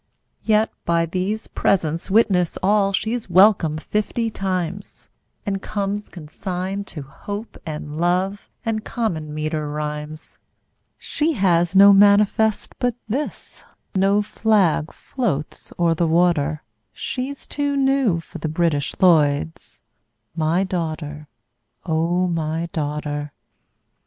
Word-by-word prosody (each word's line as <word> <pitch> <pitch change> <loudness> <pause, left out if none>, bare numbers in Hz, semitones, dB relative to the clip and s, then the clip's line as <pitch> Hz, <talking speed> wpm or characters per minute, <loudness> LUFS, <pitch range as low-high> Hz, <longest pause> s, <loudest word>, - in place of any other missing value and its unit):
Yet 215 0 +2
by 170 0 +2
these 190 +6 -2
presents 170 -3 0
witness 190 -5 +3
all 200 0 +3
She's 220 +2 -2
welcome 180 -4 +5
fifty 215 +6 -2
times, 190 -1 -4 0.3
And 195 -2 -2
comes 205 0 -3
consigned 185 +4 -5
to 150 - -7
Hope 205 +11 -7
and 150 0 -5
Love 185 +4 0 0.2
And 220 -1 -1
common 165 -13 -3
meter 155 0 -2
rhymes. 150 +1 -5 0.6
She 315 +2 -1
has 175 - +2
no 200 +1 +9
manifest 205 +2 +4
but 245 -2 0
this, 270 +8 -5 0.3
No 195 +2 +3
flag 200 -8 +1
floats 190 - -4
o'er 170 -1 +3
the 165 +1 +1
water, 160 -3 +2 0.3
She's 265 +2 -5
too 285 -1 -1
new 270 -9 +2
for 165 +1 -10
the 155 - -3
British 155 -3 0
Lloyds 145 - +2 0.5
My 165 +3 +1
daughter, 155 -5 -4 0.6
O 170 +3 +1
my 165 -1 -2
daughter! 145 -1 -3
180 Hz, 110 wpm, -22 LUFS, 155-205 Hz, 0.6 s, no